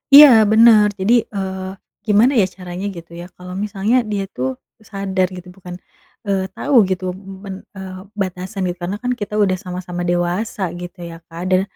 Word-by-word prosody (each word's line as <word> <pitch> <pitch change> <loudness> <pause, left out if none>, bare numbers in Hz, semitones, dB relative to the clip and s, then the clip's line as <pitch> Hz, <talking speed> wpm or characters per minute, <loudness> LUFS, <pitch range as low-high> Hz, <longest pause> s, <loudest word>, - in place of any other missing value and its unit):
Iya 295 0 +12 0.2
bener 220 -2 +7
jadi, 200 +5 +3 0.2
eee, 190 -1 -4 0.4
gimana 215 +5 +5
ya 215 - +5
caranya 180 +1 -6
gitu 170 0 -11
ya - - -8
kalau 180 0 -9
misalnya 210 +3 0 0.2
dia 200 -1 -1
tuh 130 +1 -3 0.3
sadar 195 -2 0
gitu 180 - -10
bukan, 180 -2 -9 0.5
eee, 190 -1 -1
tahu 285 - -1
gitu 185 0 -2
men 195 0 -9
e - - -8 0.4
batasan 185 +2 -4
gitu 175 0 -3
karena 190 +4 -2
kan 250 - 0
kita 210 -2 -6
udah 190 -2 +3
sama-sama 180 -1 -5
dewasa 175 +4 -1
gitu 175 +1 -9
ya - - -9
Kak. 165 +1 -9
Dan 185 0 +4
190 Hz, 170 wpm, -19 LUFS, 180-205 Hz, 0.5 s, Iya